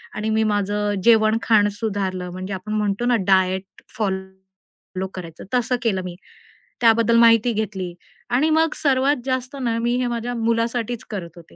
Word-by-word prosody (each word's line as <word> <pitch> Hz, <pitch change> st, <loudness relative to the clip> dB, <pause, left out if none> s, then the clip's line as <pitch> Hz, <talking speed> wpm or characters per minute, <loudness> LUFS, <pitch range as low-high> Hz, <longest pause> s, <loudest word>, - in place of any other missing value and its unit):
आणि 215 Hz, +1 st, -2 dB
मी 220 Hz, 0 st, +2 dB
माझं 205 Hz, 0 st, 0 dB
जेवण 220 Hz, -1 st, +5 dB
खाणं 210 Hz, -2 st, +4 dB
सुधारलं, 195 Hz, -5 st, -2 dB
म्हणजे 185 Hz, +2 st, -6 dB
आपण 190 Hz, +3 st, -5 dB
म्हणतो 210 Hz, +1 st, -1 dB
ना 245 Hz, 0 st, +3 dB
डायट 190 Hz, -1 st, +3 dB, 0.3 s
फॉलो 190 Hz, -1 st, -6 dB
करायचं 165 Hz, -3 st, -8 dB
तसं 250 Hz, 0 st, +1 dB
केलं. 200 Hz, -5 st, +1 dB
मी 180 Hz, -1 st, -6 dB, 0.7 s
त्याबद्दल 230 Hz, 0 st, +4 dB
माहिती 230 Hz, 0 st, +5 dB
घेतली 195 Hz, -5 st, -3 dB, 0.4 s
आणि 300 Hz, +6 st, +3 dB
मग 320 Hz, 0 st, +3 dB
सर्वात 275 Hz, 0 st, +2 dB
जास्त 260 Hz, +1 st, -2 dB
ना, 230 Hz, -2 st, 0 dB
मी 240 Hz, +1 st, 0 dB
हे 250 Hz, -1 st, 0 dB
माझ्या 240 Hz, 0 st, -3 dB
मुलासाठीच 230 Hz, 0 st, -1 dB
करत 175 Hz, -6 st, -6 dB
होते 170 Hz, -1 st, -15 dB
220 Hz, 155 wpm, -22 LUFS, 190-235 Hz, 0.7 s, जेवण